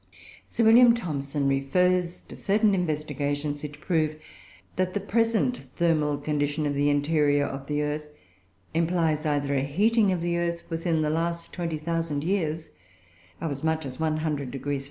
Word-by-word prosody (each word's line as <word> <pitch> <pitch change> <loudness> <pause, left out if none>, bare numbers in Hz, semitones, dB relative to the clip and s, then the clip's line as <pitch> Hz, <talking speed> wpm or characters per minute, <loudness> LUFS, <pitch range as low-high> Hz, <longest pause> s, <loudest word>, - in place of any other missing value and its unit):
Sir 230 - 0
W. 235 +2 +8
Thomson 145 -8 -2
refers 175 +6 +1
to - - -12
certain 210 +1 +2
investigations 145 -4 -2
which 145 -1 -7
prove 155 -2 0 0.6
that 185 +1 -1
the - - +2
present 230 +4 0
thermal 155 -4 +2
condition 145 +1 -1
of 145 - 0
the 145 +1 +2
interior 145 0 +2
of 135 0 -6
the 150 0 0
earth 150 0 -3 0.6
implies 165 -2 +1
either 145 -1 0
a 135 - +2
heating 205 - +2
of 180 -2 -1
the 170 0 0
earth 170 0 -2
within 165 -1 0
the 150 - +1
last 170 +1 -2
20,000 165 -3 -2
years 165 -3 -1 0.7
of 165 -1 -3
as 140 +1 -5
much 160 -1 0
as 130 +1 -7
100° 145 -3 -1
F. - - -2
155 Hz, 155 wpm, -26 LUFS, 145-175 Hz, 0.7 s, W